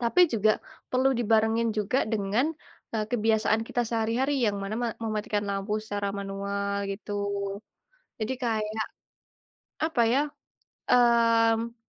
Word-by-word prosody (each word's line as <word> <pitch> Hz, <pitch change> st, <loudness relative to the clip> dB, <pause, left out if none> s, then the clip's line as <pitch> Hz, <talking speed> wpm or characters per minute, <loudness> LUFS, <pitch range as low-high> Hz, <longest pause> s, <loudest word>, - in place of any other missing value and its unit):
Tapi 235 Hz, +9 st, +2 dB
juga 215 Hz, -1 st, +3 dB, 0.4 s
perlu 260 Hz, +1 st, +3 dB
dibarengin 225 Hz, 0 st, +2 dB
juga 210 Hz, +5 st, +1 dB
dengan, 210 Hz, +5 st, +1 dB, 0.5 s
eee, 215 Hz, -1 st, +1 dB
kebiasaan 220 Hz, -1 st, +2 dB
kita 245 Hz, -, 0 dB
sehari-hari 230 Hz, +5 st, 0 dB
yang 205 Hz, -1 st, 0 dB
mana 195 Hz, +2 st, -3 dB
me 240 Hz, -, 0 dB, 0.2 s
mematikan 210 Hz, -1 st, -1 dB
lampu 200 Hz, +2 st, -1 dB
secara 205 Hz, -2 st, -3 dB
manual 200 Hz, 0 st, -2 dB
gitu. 205 Hz, +1 st, -6 dB, 1.1 s
Jadi 215 Hz, +4 st, -1 dB
kayak, 220 Hz, -1 st, -1 dB, 1.0 s
apa 315 Hz, -7 st, +1 dB
ya, 270 Hz, +3 st, +4 dB, 0.7 s
mmm, 230 Hz, -1 st, +4 dB
220 Hz, 115 wpm, -27 LUFS, 205-235 Hz, 1.1 s, ya